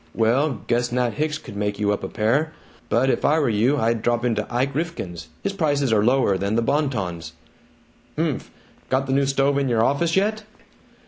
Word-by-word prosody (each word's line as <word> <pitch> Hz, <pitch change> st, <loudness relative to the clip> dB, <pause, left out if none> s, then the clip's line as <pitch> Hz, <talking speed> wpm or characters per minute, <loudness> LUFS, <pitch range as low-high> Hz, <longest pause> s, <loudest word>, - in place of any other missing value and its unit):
"Well, 125 Hz, +3 st, +1 dB
guess 120 Hz, +1 st, 0 dB
Nat 125 Hz, -1 st, 0 dB
Hicks 150 Hz, 0 st, -1 dB
could 100 Hz, -, -11 dB
make 105 Hz, 0 st, -2 dB
you 105 Hz, -1 st, +1 dB
up 105 Hz, -, -2 dB
a -, -, -2 dB
pair. 135 Hz, +9 st, 0 dB, 0.4 s
But 130 Hz, +3 st, +3 dB
if -, -, -2 dB
I 155 Hz, -, +3 dB
were 145 Hz, -5 st, +2 dB
you, 115 Hz, +7 st, +2 dB
I'd 115 Hz, -3 st, +1 dB
drop 120 Hz, +1 st, 0 dB
into 110 Hz, -3 st, -1 dB
Ike 130 Hz, +3 st, 0 dB
Rifkin's 135 Hz, -, -4 dB, 0.2 s
his 200 Hz, -, -1 dB
prices 145 Hz, -, +1 dB
are 105 Hz, -1 st, +3 dB
lower 120 Hz, -5 st, +2 dB
than 100 Hz, +2 st, -1 dB
the 115 Hz, -, +2 dB
Bon 145 Hz, +4 st, +1 dB
Ton's." 85 Hz, -, -5 dB, 0.8 s
"Humph. -, -, -2 dB, 0.4 s
Got 130 Hz, +1 st, +1 dB
the 135 Hz, -, -1 dB
new 140 Hz, 0 st, +2 dB
stove 140 Hz, +1 st, +2 dB
in 135 Hz, -2 st, 0 dB
your 115 Hz, -2 st, +2 dB
office 160 Hz, +7 st, +1 dB
yet?" 215 Hz, +3 st, +1 dB
125 Hz, 200 wpm, -23 LUFS, 110-145 Hz, 0.8 s, But